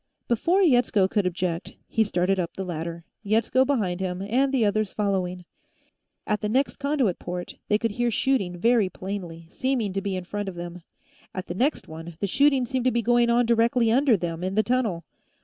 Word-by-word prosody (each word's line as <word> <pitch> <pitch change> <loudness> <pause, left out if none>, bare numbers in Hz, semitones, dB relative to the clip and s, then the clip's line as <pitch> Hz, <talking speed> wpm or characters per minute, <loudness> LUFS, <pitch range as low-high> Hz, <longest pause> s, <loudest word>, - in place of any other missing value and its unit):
Before 345 - +2
Yetsko 245 - +4
could 200 -1 0
object, 175 -1 -3
he 225 - +2
started 190 -1 0
up 170 -2 -3
the 190 - -4
ladder, 170 -1 -5 0.2
Yetsko 225 +5 +2
behind 200 -11 0
him 185 0 -3
and 255 +7 +1
the 255 -5 +2
others 210 0 0
following. 185 -3 -1 0.8
At 210 0 -1
the 210 - -1
next 265 +5 +1
conduit 280 -9 0
port, 180 0 -6
they 210 - +3
could 230 0 -1
hear 240 +3 0
shooting 220 -7 0
very 225 0 +3
plainly, 185 -4 -6
seeming 250 -7 -1
to 195 - -1
be 195 -1 -2
in 185 - -4
front 205 +2 -4
of 185 - -9
them. 175 0 -7 0.5
At 185 - -4
the - - -5
next 265 - 0
one, 165 +1 -9
the - - 0
shooting 270 +5 +3
seemed 255 0 -2
to 255 - +4
be 235 0 0
going 240 0 +3
on 240 +1 +3
directly 230 0 +3
under 255 -2 +4
them, 170 -1 -4
in 190 +1 -2
the 215 - +3
tunnel. 225 -9 0
210 Hz, 200 wpm, -25 LUFS, 180-245 Hz, 0.8 s, Yetsko